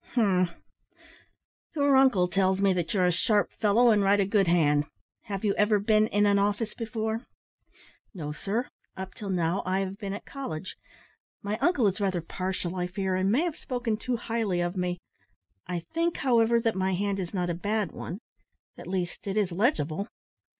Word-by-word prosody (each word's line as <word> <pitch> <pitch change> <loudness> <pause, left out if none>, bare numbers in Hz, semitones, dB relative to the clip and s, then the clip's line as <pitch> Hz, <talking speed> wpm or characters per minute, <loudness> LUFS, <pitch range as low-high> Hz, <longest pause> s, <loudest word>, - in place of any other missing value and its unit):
"Umph! 185 -6 +3 1.3
Your 285 -2 +3
uncle 255 -9 +5
tells 190 +1 +1
me 195 -1 +3
that 175 -3 -2
you're 185 -3 +2
a 180 - +4
sharp 205 +4 +1
fellow, 225 +3 +4
and 210 -2 +3
write 200 +1 +4
a 200 - +3
good 200 -1 +2
hand. 150 -4 +3 0.4
Have 200 -1 -4
you 200 - +3
ever 210 0 +4
been 215 +1 +3
in 205 -1 +2
an 200 -1 +4
office 205 +2 0
before?" 220 0 -3 0.8
"No, 155 -8 -5
sir. 205 +10 -2 0.3
Up 190 0 -6
till 205 - -7
now 175 0 0
I 185 +1 0
have 195 +1 -4
been 200 -3 -4
at 200 - -7
college. 190 - -6 0.7
My 205 +1 -1
uncle 315 -8 +2
is 200 +1 +1
rather 190 -3 +1
partial, 185 +1 -4
I 180 0 -1
fear, 190 0 -2
and 190 +1 +1
may 250 +8 +3
have 345 -4 -2
spoken 245 -3 -2
too 245 +3 -2
highly 225 -6 -1
of 175 +1 -1
me. 180 -1 -1 0.7
I 175 -1 -3
think, 335 +1 0
however, 235 -3 +3
that 225 -1 +1
my 190 0 0
hand 200 +1 -1
is 180 -2 -4
not 180 -3 -1
a - - -1
bad 205 +1 -1
one. 185 +7 -7 0.6
At - - -9
least 180 +1 -3
it 195 +1 -2
is 200 -4 +1
legible." 195 - 0
200 Hz, 185 wpm, -27 LUFS, 180-220 Hz, 1.3 s, uncle